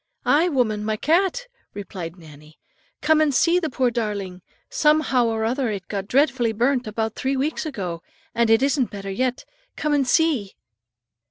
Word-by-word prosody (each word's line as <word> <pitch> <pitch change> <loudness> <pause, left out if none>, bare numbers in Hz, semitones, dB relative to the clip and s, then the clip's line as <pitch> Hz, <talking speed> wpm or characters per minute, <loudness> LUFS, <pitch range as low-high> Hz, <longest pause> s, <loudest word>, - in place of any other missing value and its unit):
"Aye, 325 +5 +3
woman, 225 -8 0
my 215 0 -1
cat," 380 - +1 0.3
replied 180 -4 -7
Nannie; 155 -2 -15 0.4
"come 315 0 +3
and 305 -2 +3
see 335 +8 +3
the 320 -3 -2
poor 255 -1 0
darling. 200 -5 -3 0.3
Somehow 300 -5 +2
or 220 -1 -1
other 250 +1 0
it 200 -3 -5
got 200 -2 -4
dreadfully 255 -3 +2
burnt, 245 +2 +1
about 220 +1 -2
three 265 +1 -2
weeks 305 +4 -2
ago, 180 - -5 0.3
and 235 -1 +2
it 225 +3 +4
isn't 275 -3 +1
better 195 -1 -6
yet; 250 +4 -2 0.3
come 300 -1 -1
and 280 -3 +2
see." 265 - +1
240 Hz, 165 wpm, -23 LUFS, 205-290 Hz, 0.4 s, it